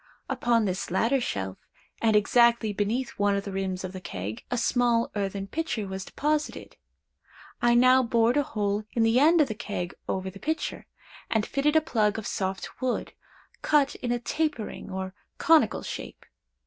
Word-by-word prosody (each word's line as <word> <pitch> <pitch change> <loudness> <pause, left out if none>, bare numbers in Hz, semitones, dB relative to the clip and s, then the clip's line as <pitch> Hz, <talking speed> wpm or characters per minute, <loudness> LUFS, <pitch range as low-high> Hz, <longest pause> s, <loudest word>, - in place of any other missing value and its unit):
Upon 235 -2 +1
this 185 -1 -2
latter 255 +3 +2
shelf, 95 - -3 0.4
and 220 -2 +3
exactly 235 +1 +4
beneath 230 +7 -1
one 205 0 +3
of 200 - -1
the 200 - -6
rims 190 -1 -3
of 185 0 -5
the 185 - -7
keg, 100 - -6
a 245 - -1
small 235 0 +2
earthern 195 -1 -2
pitcher 245 -4 -3
was 190 0 -5
deposited. 300 +1 -2 0.9
I 240 0 +4
now 255 +2 +6
bored 235 0 +2
a 290 - +4
hole 210 -5 -1
in 230 - +2
the 225 +2 +4
end 320 +4 +5
of 290 - +3
the 220 - -3
keg 205 -5 -4 0.2
over 190 0 -2
the 195 - -12
pitcher, 315 +6 -3 0.4
and 220 -1 +1
fitted 295 +2 0
in 315 - +5
a - - -25
plug 215 -4 +1
of 220 - -5
soft 190 +4 -4
wood, 255 -1 -2 0.5
cut 290 -2 +3
in 240 - -4
a 240 - +1
tapering 290 -3 -3
or 190 0 -4 0.2
conical 325 -1 +4
shape. - - -7
225 Hz, 175 wpm, -27 LUFS, 195-255 Hz, 0.9 s, now